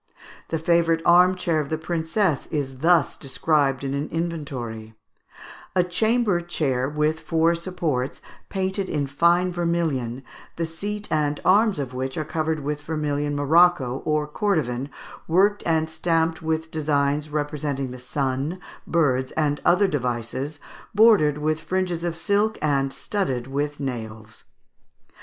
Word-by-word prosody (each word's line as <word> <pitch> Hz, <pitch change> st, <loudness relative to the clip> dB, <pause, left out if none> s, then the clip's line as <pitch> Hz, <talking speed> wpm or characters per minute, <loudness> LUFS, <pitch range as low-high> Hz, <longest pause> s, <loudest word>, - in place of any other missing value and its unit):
The 165 Hz, -, 0 dB
favourite 165 Hz, 0 st, +2 dB
arm 180 Hz, +2 st, +6 dB
chair 170 Hz, -3 st, 0 dB
of 145 Hz, -2 st, -3 dB
the 160 Hz, -, -1 dB
princess 160 Hz, +1 st, -1 dB
is 135 Hz, -4 st, -3 dB
thus 165 Hz, +1 st, +3 dB
described 140 Hz, 0 st, 0 dB
in 135 Hz, 0 st, -2 dB
an 140 Hz, +2 st, -2 dB
inventory: 135 Hz, -10 st, -4 dB, 0.8 s
"A 180 Hz, -, +4 dB
chamber 210 Hz, +1 st, +1 dB
chair 135 Hz, -7 st, -1 dB
with 150 Hz, +1 st, 0 dB
four 165 Hz, +1 st, +2 dB
supports, 165 Hz, -7 st, -2 dB, 0.3 s
painted 190 Hz, 0 st, -2 dB
in 145 Hz, -2 st, 0 dB
fine 170 Hz, +6 st, +2 dB
vermilion, 160 Hz, -8 st, -1 dB, 0.3 s
the 165 Hz, -, -1 dB
seat 205 Hz, +6 st, -5 dB
and 150 Hz, -1 st, +1 dB
arms 210 Hz, +1 st, +4 dB
of 135 Hz, -3 st, -4 dB
which 130 Hz, +1 st, -3 dB
are 155 Hz, -, -2 dB
covered 155 Hz, 0 st, -1 dB
with 150 Hz, +1 st, -3 dB
vermilion 145 Hz, -1 st, -2 dB
morocco, 145 Hz, -3 st, +3 dB
or 150 Hz, -1 st, +1 dB
cordovan, 150 Hz, -, -1 dB, 0.4 s
worked 200 Hz, +5 st, +3 dB
and 160 Hz, -1 st, +2 dB
stamped 160 Hz, 0 st, 0 dB
with 160 Hz, 0 st, -2 dB
designs 145 Hz, -1 st, 0 dB
representing 145 Hz, -3 st, -2 dB
the 125 Hz, -, -8 dB
sun, 135 Hz, +6 st, -2 dB, 0.3 s
birds, 130 Hz, -6 st, +1 dB
and 150 Hz, -2 st, 0 dB
other 190 Hz, +3 st, +4 dB
devices, 130 Hz, 0 st, -3 dB, 0.4 s
bordered 205 Hz, -10 st, +5 dB
with 155 Hz, +1 st, 0 dB
fringes 180 Hz, -1 st, -2 dB
of 170 Hz, -1 st, -2 dB
silk 205 Hz, +5 st, +1 dB
and 140 Hz, -3 st, +1 dB
studded 135 Hz, -, -2 dB
with 145 Hz, +2 st, -3 dB
nails." 110 Hz, -4 st, -6 dB
155 Hz, 135 wpm, -24 LUFS, 140-170 Hz, 0.8 s, arm